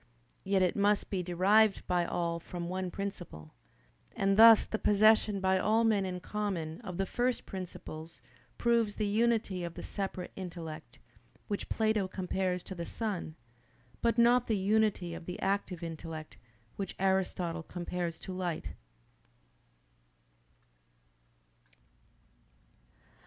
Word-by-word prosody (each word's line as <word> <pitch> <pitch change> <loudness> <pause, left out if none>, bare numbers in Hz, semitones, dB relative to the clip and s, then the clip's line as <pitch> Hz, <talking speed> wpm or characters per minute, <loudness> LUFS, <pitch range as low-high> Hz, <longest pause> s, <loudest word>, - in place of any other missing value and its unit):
Yet 195 -1 +2
it 180 - +1
must 205 0 +2
be 190 -2 0
derived 195 +4 +3
by 175 -1 +1
all 170 -1 -1
from 170 +1 -6
one 185 0 -2
principle. 175 - -6 0.6
And 195 0 +2
thus 225 +1 +9
the 220 - -3
possession 210 0 +4
by 190 0 +2
all 220 +4 +3
men 210 -4 +2
in 180 -1 -5
common 190 -5 -3
of 185 -6 -6
the 195 - 0
first 245 +5 -1
principles 170 -3 -8 0.4
proves 235 -3 +2
the 215 - -1
unity 215 -3 +1
of 170 -1 -5
the - - -7
separate 190 -2 -4
intellect, 170 -4 -7 0.5
which 205 -2 -3
Plato 220 -3 +1
compares 185 -1 -2
to - - -7
the 170 -2 -5
sun; 190 -5 -4 0.7
but 235 0 +2
not 240 +1 +5
the 220 - +1
unity 195 -3 +1
of 170 0 -9
the 180 - -5
active 195 -3 -1
intellect, 160 -1 -7 0.4
which 195 -2 -4
Aristotle 185 -3 0
compares 175 0 -4
to 190 - -6
light. 180 -3 -3
190 Hz, 125 wpm, -31 LUFS, 175-210 Hz, 0.7 s, thus